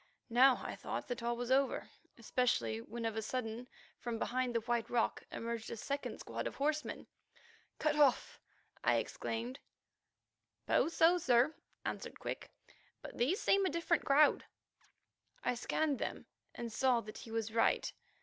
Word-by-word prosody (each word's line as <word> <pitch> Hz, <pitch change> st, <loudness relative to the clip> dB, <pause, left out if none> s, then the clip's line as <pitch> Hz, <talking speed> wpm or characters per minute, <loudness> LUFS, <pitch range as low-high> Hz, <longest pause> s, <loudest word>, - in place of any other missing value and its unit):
Now 255 Hz, +2 st, +6 dB
I -, -, -4 dB
thought -, -, -4 dB
that 245 Hz, -, -3 dB
all 235 Hz, 0 st, -1 dB
was 245 Hz, +1 st, -3 dB
over, 270 Hz, 0 st, +2 dB, 0.3 s
especially 215 Hz, -, 0 dB
when 230 Hz, -, -6 dB
of 225 Hz, -1 st, -1 dB
a 220 Hz, -, -1 dB
sudden 230 Hz, +1 st, -3 dB, 0.3 s
from 235 Hz, -2 st, -3 dB
behind 250 Hz, +1 st, -1 dB
the 230 Hz, -, +2 dB
White 235 Hz, 0 st, -1 dB
Rock 240 Hz, -2 st, +1 dB
emerged 230 Hz, -1 st, -4 dB
a 235 Hz, -, -5 dB
second 280 Hz, +6 st, -3 dB
squad -, -, -4 dB
of -, -, -6 dB
horsemen. 300 Hz, +2 st, -1 dB, 0.7 s
"Cut 305 Hz, -1 st, +1 dB
off!" 290 Hz, -4 st, +3 dB, 0.4 s
I -, -, +4 dB
exclaimed. 240 Hz, +4 st, -3 dB, 1.1 s
"Suppose 330 Hz, -, +2 dB
so, 345 Hz, +2 st, +5 dB
sir," 250 Hz, -1 st, +4 dB, 0.3 s
answered -, -, -4 dB
Quick, -, -, -5 dB, 0.5 s
"but -, -, -8 dB
these 285 Hz, -, +2 dB
seem 395 Hz, 0 st, +3 dB
a 375 Hz, -, +2 dB
different 335 Hz, -1 st, +1 dB
crowd." 290 Hz, +2 st, +5 dB, 1.0 s
I -, -, +2 dB
scanned 285 Hz, +4 st, 0 dB
them -, -, -4 dB, 0.3 s
and 235 Hz, -2 st, -5 dB
saw 250 Hz, 0 st, +3 dB
that 215 Hz, -1 st, -9 dB
he -, -, -10 dB
was 225 Hz, -1 st, -2 dB
right. 230 Hz, -, +2 dB
245 Hz, 155 wpm, -35 LUFS, 230-280 Hz, 1.1 s, Now